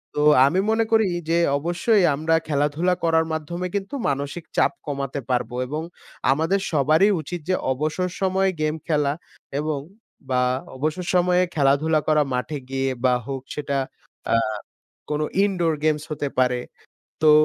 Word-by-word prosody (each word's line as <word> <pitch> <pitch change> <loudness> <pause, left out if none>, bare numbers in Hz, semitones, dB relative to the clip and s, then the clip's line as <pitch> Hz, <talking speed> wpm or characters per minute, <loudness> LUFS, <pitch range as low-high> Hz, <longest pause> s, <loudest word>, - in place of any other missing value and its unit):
তো 150 - +1 0.2
আমি 160 +7 +2
মনে 225 +1 +3
করি 220 -2 +4 0.2
যে, 170 - +3 0.2
অবশ্যই 175 +7 +2
আমরা 160 +3 +1
খেলাধুলা 150 +4 +1
করার 160 -1 +3
মাধ্যমে 170 +3 -3
কিন্তু 200 +6 -3
মানসিক 140 +4 -3
চাপ - - +4 0.2
কমাতে 140 -1 -3
পারবো 125 -1 -1
এবং 150 +4 -3 0.5
আমাদের 165 +8 +1
সবারই 155 +6 +4
উচিত 175 +4 -5
যে 185 - +3 0.2
অবসর 155 +6 -1
সময়ে 190 0 +2
গেম 155 0 +1
খেলা 150 -3 +2 0.5
এবং 150 -1 -1 0.5
বা 125 -1 +2 0.4
অবসর 155 +6 -2
সময়ে 180 0 +4
খেলাধুলা 150 +2 +3
করা 155 -1 +4
মাঠে 125 +4 -2
গিয়ে। 135 0 0 0.2
বা 125 - +5
হোক 135 -1 -4
সেটা 140 -2 -2 0.6
আ - - +5 0.7
কোনো 150 0 0 0.2
indoor 175 -5 +1
games 155 -1 +1
হতে 145 -1 -2
পারে। 125 -1 +2 0.6
তো 155 - +7
155 Hz, 145 wpm, -23 LUFS, 140-175 Hz, 0.7 s, তো